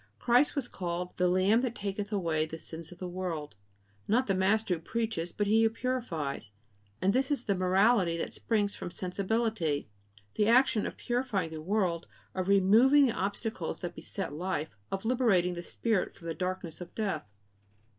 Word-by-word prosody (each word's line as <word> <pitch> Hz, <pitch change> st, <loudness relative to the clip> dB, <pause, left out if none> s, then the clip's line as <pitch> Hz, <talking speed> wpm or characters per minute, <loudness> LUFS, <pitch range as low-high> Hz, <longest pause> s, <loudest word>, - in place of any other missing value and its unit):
Christ 250 Hz, +6 st, +3 dB
was 275 Hz, -4 st, -1 dB
called 180 Hz, -2 st, -4 dB
"the 180 Hz, -, +3 dB
Lamb 190 Hz, +6 st, +4 dB
that 245 Hz, -2 st, -2 dB
taketh 200 Hz, +1 st, -4 dB
away 165 Hz, -6 st, 0 dB
the 160 Hz, -, -6 dB
sins 160 Hz, +1 st, -7 dB
of 180 Hz, -, -11 dB
the 180 Hz, -, -5 dB
world," 175 Hz, -5 st, -4 dB, 0.5 s
not 245 Hz, +5 st, +3 dB
the 195 Hz, -, +1 dB
Master 195 Hz, +2 st, +2 dB
who 170 Hz, -, -2 dB
preaches, 215 Hz, -2 st, -2 dB
but 205 Hz, -, -1 dB
He 220 Hz, +2 st, +4 dB
who 225 Hz, -, +5 dB
purifies. 205 Hz, -, -3 dB, 0.5 s
And 195 Hz, +2 st, +4 dB
this 265 Hz, +2 st, +1 dB
is 285 Hz, -5 st, 0 dB
the 205 Hz, -, +1 dB
morality 185 Hz, -1 st, +3 dB
that -, -, -3 dB
springs 205 Hz, -3 st, 0 dB
from -, -, -6 dB
sensibility: 185 Hz, -, -1 dB, 0.4 s
the 210 Hz, -, +2 dB
action 235 Hz, -2 st, +4 dB
of -, -, -7 dB
purifying 240 Hz, -9 st, -1 dB
the 160 Hz, -1 st, -6 dB
world, 180 Hz, -2 st, 0 dB, 0.3 s
of 185 Hz, -1 st, -2 dB
removing 220 Hz, +9 st, +6 dB
the 250 Hz, -, +2 dB
obstacles 200 Hz, -2 st, -3 dB
that 175 Hz, -1 st, -4 dB
beset 195 Hz, -4 st, -5 dB
life, 160 Hz, -5 st, -3 dB, 0.2 s
of 195 Hz, +2 st, -3 dB
liberating 220 Hz, -8 st, +3 dB
the 175 Hz, -, -5 dB
spirit 215 Hz, +3 st, -1 dB
from 170 Hz, -, -15 dB
the 165 Hz, -, -2 dB
darkness 180 Hz, -1 st, -4 dB
of 175 Hz, -, -9 dB
death. 205 Hz, -, -2 dB
195 Hz, 175 wpm, -30 LUFS, 175-225 Hz, 0.5 s, removing